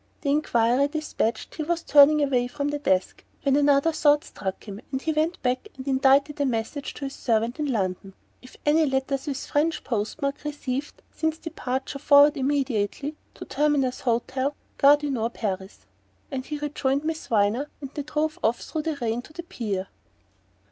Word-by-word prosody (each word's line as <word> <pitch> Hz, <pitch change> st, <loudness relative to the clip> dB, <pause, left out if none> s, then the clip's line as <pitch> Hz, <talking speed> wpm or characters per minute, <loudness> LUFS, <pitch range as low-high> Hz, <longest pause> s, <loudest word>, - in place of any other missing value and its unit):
The 280 Hz, -, 0 dB
enquiry 255 Hz, -2 st, +2 dB
despatched, 290 Hz, -7 st, -2 dB
he -, -, -5 dB
was 335 Hz, +2 st, -1 dB
turning 295 Hz, +1 st, +6 dB
away 250 Hz, -3 st, +1 dB
from 285 Hz, +3 st, -3 dB
the 290 Hz, 0 st, -2 dB
desk 190 Hz, -9 st, 0 dB, 0.2 s
when 275 Hz, -1 st, +3 dB
another 285 Hz, +2 st, +4 dB
thought 295 Hz, -1 st, +3 dB
struck 190 Hz, -, -6 dB
him 205 Hz, 0 st, -8 dB
and 265 Hz, -, -1 dB
he 320 Hz, +3 st, -1 dB
went 315 Hz, +3 st, 0 dB
back 255 Hz, +9 st, 0 dB
and 260 Hz, +1 st, -8 dB
indited 275 Hz, +2 st, +3 dB
a -, -, +3 dB
message 245 Hz, +4 st, -3 dB
to 280 Hz, -, -5 dB
his 270 Hz, -, -5 dB
servant 230 Hz, +3 st, 0 dB
in 295 Hz, -2 st, 0 dB
London: 195 Hz, -3 st, -2 dB, 0.3 s
"If 255 Hz, -, -15 dB
any 305 Hz, +1 st, +4 dB
letters 270 Hz, +1 st, -1 dB
with 275 Hz, -2 st, -3 dB
French 310 Hz, +3 st, 0 dB
post 220 Hz, +3 st, -2 dB
mark 280 Hz, -1 st, -2 dB
received 290 Hz, -2 st, -4 dB
since 320 Hz, 0 st, -1 dB
departure 265 Hz, -4 st, -4 dB
forward 290 Hz, +1 st, +6 dB
immediately 275 Hz, 0 st, -1 dB, 0.2 s
to -, -, -8 dB
Terminus 285 Hz, -3 st, +1 dB
Hotel 260 Hz, +3 st, -1 dB, 0.2 s
Gare 285 Hz, +1 st, +7 dB
du 295 Hz, -1 st, -3 dB
Nord 235 Hz, -2 st, -2 dB
Paris." 190 Hz, -2 st, -4 dB, 0.5 s
Then 265 Hz, -2 st, -2 dB
he 300 Hz, +3 st, -5 dB
rejoined 285 Hz, -1 st, -1 dB
Miss 320 Hz, 0 st, -3 dB
Viner, 225 Hz, +6 st, +1 dB
and 275 Hz, -2 st, -7 dB
they 295 Hz, -, -3 dB
drove 305 Hz, +2 st, -2 dB
off 230 Hz, +2 st, +2 dB
through 315 Hz, -, -3 dB
the 315 Hz, 0 st, -2 dB
rain 235 Hz, -2 st, -1 dB
to 305 Hz, -, -16 dB
the 345 Hz, -, -7 dB
pier. 205 Hz, -, -3 dB
275 Hz, 180 wpm, -25 LUFS, 245-295 Hz, 0.5 s, Gare